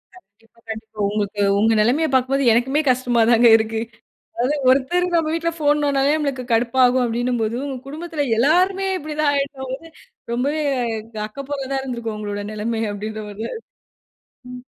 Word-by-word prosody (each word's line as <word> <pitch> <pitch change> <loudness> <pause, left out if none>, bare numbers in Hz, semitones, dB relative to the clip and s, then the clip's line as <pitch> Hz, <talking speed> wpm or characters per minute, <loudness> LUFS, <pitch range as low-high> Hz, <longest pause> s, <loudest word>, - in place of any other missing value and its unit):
கண்டிப்பா, 225 - -23
கண்டிப்பா. 220 -1 -8
உங்களுக்கு 205 0 -2 0.2
உங்க 225 +2 +3
நிலமையப் 265 +7 +1
பார்க்கும்போது 260 0 +2
எனக்குமே, 265 +6 +2
கஷ்டமா 250 -2 +2
தாங்க 235 0 +6
இருக்கு. 220 0 -2 0.6
அதாவது 255 +5 0
ஒருத்தர் 280 +8 +2
நம்ம 325 -2 +2
வீட்ல் 335 0 -2
போன் 295 0 +3
நோண்டுனாவே 280 0 +2
நம்மளுக்கு 280 -4 -2
கடுப்பாகும், 245 +2 +3
அப்பிடின்னும்போது, 235 -1 -1
உங்க 275 -2 -4
குடும்பத்துல 310 0 -4
எல்லாருமே 370 +9 +3
இப்பிடி 305 -2 -7
தான் 295 -2 +3
ஆயிட்டபோது, 275 +1 -4 0.4
ரொம்பவே 285 +6 0 0.6
அக்கப்போரா 275 +5 -6
தான் 270 - 0
இருந்திருக்கும் 235 -4 -4
உங்களோட 205 -1 -4
நிலமைய 220 0 -2
அப்பிடின்றமாரி 210 0 -6
தான், 455 - -6 0.9
ம். 250 0 -9
255 Hz, 140 wpm, -21 LUFS, 225-290 Hz, 0.9 s, தாங்க